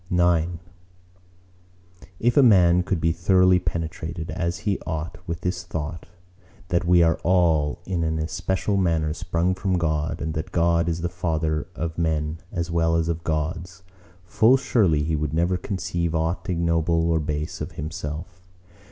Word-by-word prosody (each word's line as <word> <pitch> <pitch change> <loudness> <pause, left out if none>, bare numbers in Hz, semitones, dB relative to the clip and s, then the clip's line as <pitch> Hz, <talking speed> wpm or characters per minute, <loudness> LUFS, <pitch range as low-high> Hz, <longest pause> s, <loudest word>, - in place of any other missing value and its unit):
IX 85 -1 +2 1.7
If 120 +1 +2
a 145 - +7
man 90 -8 +5
could 90 -1 -1
be 80 +1 +2
throughly 90 +2 +4
penetrated, 80 -1 -4
as 85 0 -2
he 100 -2 +1
ought, 80 0 -5
with 85 0 -4
this 90 0 -2
thought, 80 -1 -5 0.6
that 85 -1 +1
we 85 0 +5
are 80 0 +2
all 85 -3 +2
in 90 -3 -1
an 80 0 -1
especial 95 +5 -1
manner 80 -4 +1
sprung 85 +3 -1
from 95 0 -1
God, 80 -2 -1
and 80 - -3
that 80 0 -4
God 85 0 +2
is 85 0 -2
the 85 - 0
Father 80 -3 -2
of 80 +1 -4
men 80 -1 -1
as 85 -3 -3
well 80 -1 +2
as 85 0 +1
of 85 0 -3
Gods, 85 +3 -3 0.4
full 115 +8 +4
surely 95 - +2
he 80 +1 0
would 75 0 -2
never 85 +3 +2
conceive 85 -3 -2
aught 80 +3 -1
ignoble 85 -1 +1
or 80 - +2
base 75 0 -4
of - - -5
himself. 80 +3 -6
85 Hz, 160 wpm, -24 LUFS, 80-90 Hz, 1.7 s, a